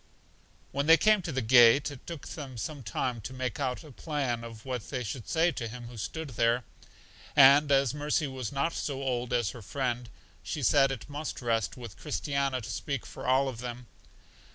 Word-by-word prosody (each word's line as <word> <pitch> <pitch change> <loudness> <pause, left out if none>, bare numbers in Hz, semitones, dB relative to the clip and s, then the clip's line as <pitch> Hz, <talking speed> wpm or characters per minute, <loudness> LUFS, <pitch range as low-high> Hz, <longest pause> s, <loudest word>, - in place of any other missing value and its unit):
When 140 +2 -1
they 165 +1 +9
came 215 +1 +4
to 170 -2 -4
the 130 -3 -1
gate, 120 +4 +6
it 140 - -12
took 165 -4 -7
them 135 -5 -7
some 145 +5 -5
time 120 +3 -2
to 130 - -7
make 130 +2 -3
out 130 +1 -2
a 155 - -12
plan 135 -4 -2
of 115 -2 -10
what 125 -5 -4
they 125 -3 -3
should 115 +2 -6
say 170 +1 +3
to 120 -7 -4
Him 120 +1 -8
who 120 - -11
stood 160 +8 -4
there; 120 0 +1 0.7
and 140 +1 +7
as 135 -2 +4
Mercy 150 +1 0
was 130 -4 -4
not 140 +4 0
so 135 -2 -3
old 125 -2 -1
as 120 -5 +1
her 120 - -10
friend, 120 +1 -3 0.3
she - - -4
said 135 - +5
that 135 -4 -4
it - - -17
must 150 +1 -4
rest 115 -3 -1
with 120 -5 -9
Christiana 140 -3 -1
to 110 - -8
speak 140 -5 -3
for - - -8
all 130 +2 +4
of 125 -4 -5
them. 120 0 -6
130 Hz, 205 wpm, -29 LUFS, 120-145 Hz, 0.7 s, they